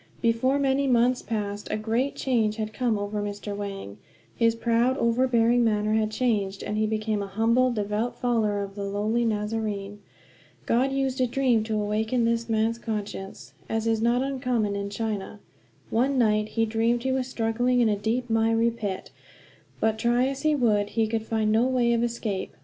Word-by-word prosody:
Before 235 +4 +2
many 275 0 +1
months 245 0 +3
passed 205 -2 -4
a - - -1
great 230 +6 -1
change 225 -5 +1
had 215 -1 -4
come 230 0 0
over 205 +1 -3
Mr. 205 0 -5
Wang; 195 - -6 0.4
his 230 -1 +2
proud, 235 +3 +1
overbearing 235 0 +3
manner 215 -1 +1
had 220 -1 +2
changed, 210 -4 -1
and 210 - -3
he 215 0 +1
became 215 -1 -1
a 200 - -4
humble, 230 +6 +2
devout 215 +1 -2
follower 215 -4 0
of 195 0 -7
the 200 0 -5
lowly 210 +4 0
Nazarene. 210 -2 -2 0.7
God 255 +4 +2
used 270 -1 -1
a 255 - +3
dream 245 -3 +2
to 220 -1 -1
awaken 220 +3 0
this 230 0 0
man's 225 +1 +1
conscience 210 -4 -6 0.2
as 225 0 -1
is 225 -1 +1
not 240 +2 +2
uncommon 250 -6 -1
in 200 0 -3
China. 210 -1 -4 0.5
One 260 +4 +2
night 215 -3 +2
he 225 - +4
dreamed 230 +2 0
he 265 - 0
was 260 -1 -1
struggling 245 +1 0
in 235 - +4
a 210 - +2
deep, 225 +5 -1
miry 225 0 +2
pit; 205 -5 -5 0.7
but 220 0 +1
try 240 +2 +2
as 275 +1 -3
he 310 0 +2
would 210 -6 +2
he 225 - +4
could 220 0 -3
find 220 -1 +1
no 225 +3 +3
way 245 -2 +2
of 230 - +1
escape. 230 -5 -3
225 Hz, 180 wpm, -26 LUFS, 210-245 Hz, 0.7 s, he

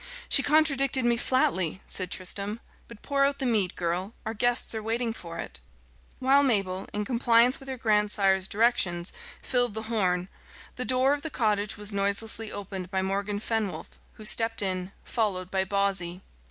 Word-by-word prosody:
"She 275 - +6
contradicted 275 -4 +3
me 240 0 +3
flatly," 190 -9 0
said 185 -2 -2
Tristram. 200 +4 -2 0.3
"But 235 -2 -14
pour 280 -1 +1
out 280 0 +1
the 270 - -3
mead, 210 -7 +1
girl; 180 +5 -3
our 220 - -3
guests 245 +3 +1
are 220 - -3
waiting 225 +1 -2
for 170 -6 -9
it." 60 - -7 0.6
While 270 +2 +4
Mabel, 195 -8 0
in 210 0 -2
compliance 235 +1 +3
with 270 -1 -10
her 260 - -4
grandsire's 210 -4 +2
directions, 200 -6 +1 0.3
filled 245 -4 +1
the 220 - -4
horn, 180 -4 +1 0.5
the 250 - -3
door 255 +4 +3
of 290 - -3
the 320 - -5
cottage 210 -6 0
was 205 0 -6
noiselessly 200 +2 0
opened 190 -2 -5
by 190 -1 -1
Morgan 200 +2 -2
Fenwolf, 210 -7 -3 0.2
who 215 - -12
stepped 225 0 +2
in, 185 -1 -2
followed 190 -6 -2
by 190 -1 +1
Bawsey. 190 -2 -1
210 Hz, 165 wpm, -27 LUFS, 190-240 Hz, 0.6 s, She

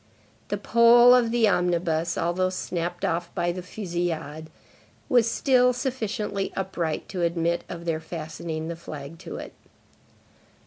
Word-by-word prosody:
The - - -2
pole 240 +1 +6
of 245 -2 +4
the 230 -1 +3
omnibus, 170 -3 +1
although 175 +2 +1
snapped 175 -1 -3
off 170 +1 -1
by 175 0 +1
the 180 +1 -5
fusillade, 170 -5 -4 0.6
was 235 -2 +4
still 250 0 +3
sufficiently 225 -6 -2
upright 180 -5 -2
to 185 - -4
admit 170 0 0
of 170 -1 -7
their 165 -2 0
fastening 160 0 -5
the 170 - -4
flag 155 -1 -9
to - - -8
it. - - -8
175 Hz, 135 wpm, -25 LUFS, 165-220 Hz, 0.6 s, pole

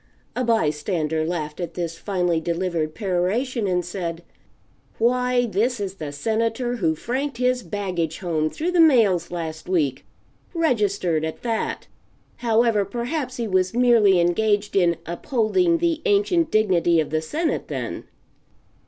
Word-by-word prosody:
A 255 - 0
by 225 -10 +2
stander 155 0 -2
laughed, 155 -2 -3
at 170 -2 -5
this 170 -2 -3
finely 180 -4 0
delivered 165 -2 -2
peroration; 205 +5 -1
and 180 -2 0
said: 175 -2 -5 0.7
"Why, 250 +1 +2
this 230 +2 0
is 195 -2 -3
the 155 -7 -6
Senator 230 - -1
who 165 -7 +1
franked 260 - -3
his 250 0 +1
baggage 180 -7 -3
home 160 -4 -1
through 335 - -2
the 360 - +1
mails 220 - +4
last 160 -1 -6
week 145 -8 0 0.5
registered, 205 - +1
at 160 0 -5
that. 230 -2 -2 0.5
However, 230 -2 +2
perhaps 245 - -4
he 235 -2 -2
was 185 0 +1
merely 230 -6 +5
engaged 205 +4 +1
in 175 -3 +3
'upholding 255 - +1
the 335 -2 0
ancient 390 -6 +2
dignity 180 - +3
of 155 - -1
the 155 0 0
Senate,' 315 - -2
then." - - -5
200 Hz, 140 wpm, -23 LUFS, 170-245 Hz, 0.7 s, merely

